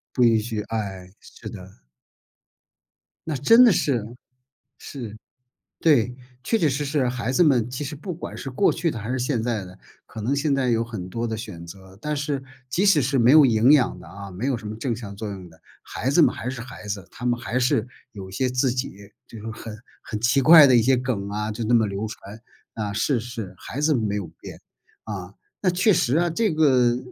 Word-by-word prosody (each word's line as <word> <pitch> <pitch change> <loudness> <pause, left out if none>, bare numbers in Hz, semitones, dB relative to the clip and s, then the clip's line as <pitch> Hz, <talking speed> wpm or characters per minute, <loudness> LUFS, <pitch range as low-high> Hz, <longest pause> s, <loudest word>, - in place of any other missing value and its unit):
不 125 - +2
允 115 -1 +5
许， 110 -1 -4
哎， 95 -5 -4
是 - - -11
的。 90 -8 -12 1.4
那 155 -3 -2
真 230 - +6
的 235 - +7
是， 125 -9 0 0.7
是， 120 -7 -8 0.6
对。 125 -6 +3 0.3
确 225 - +1
确 160 - +2
实 140 +2 -1
实， 140 -2 0
孩 125 0 -2
子 175 - +4
们 125 -6 +3
其 130 +4 -4
实 150 +2 -5
不 180 +6 -6
管 - - -7
是 135 - -6
过 130 +10 +2
去 170 - -1
的 120 - -5
还 110 +3 -5
是 130 - -1
现 125 -2 -1
在 115 -5 -1
的， 90 +1 -12 0.3
可 110 - -8
能 130 +6 0
现 140 0 +1
在 130 -3 +1
有 115 0 +2
很 110 -6 -7
多 115 +5 -3
的 110 -1 -3
选 105 -7 -8
择。 95 +1 -13
但 150 0 -2
是， 145 -1 -2 0.3
即 175 +10 0
使 195 -7 +5
是 135 0 +1
没 120 +1 +4
有 150 -2 +8
营 115 +3 +4
养 135 -5 +2
的 - - -13
啊， 100 -1 -9
没 105 +9 -4
有 130 -4 0
什 110 -2 -9
么 110 - -5
正 115 0 -2
向 100 -4 -8
作 105 0 -5
用 95 -3 -8
的。 80 0 -21 0.2
孩 130 - -3
子 150 - +2
们 160 - +5
还 125 - -5
是 130 -3 -6
孩 120 -3 -9
子， 100 -3 -5
他 125 -1 -5
们 120 0 0
还 120 +1 -2
是， 120 -2 +1 0.3
有 95 -2 -8
一 - - -12
些 130 +4 0
自 125 0 +1
己， 130 +2 -3 0.4
这 115 - -11
种 110 +1 -7
很 110 -1 -9 0.2
很 105 - -5
奇 120 +4 +2
怪 155 0 +9
的 130 -2 +5
一 115 - +5
些 130 +2 +3
梗 115 -6 -3
啊， 105 +1 -3
就 115 +2 -4
那 120 +2 +3
么 110 -2 +4
流 100 +2 -3
传， 105 0 -10 0.3
啊， 105 -2 -3
是 115 +4 0
是， 115 -5 -7
孩 135 - -7
子 150 +1 +3
没 110 -5 -1
有 100 -3 -3
变。 - - -10 0.4
啊， 100 -2 -7 0.3
那 185 - +2
确 185 +4 +3
实 135 -1 +2
啊， 175 0 +2
这 215 +1 +1
个， 130 -6 +3
120 Hz, 240 characters per minute, -23 LUFS, 105-140 Hz, 1.4 s, 怪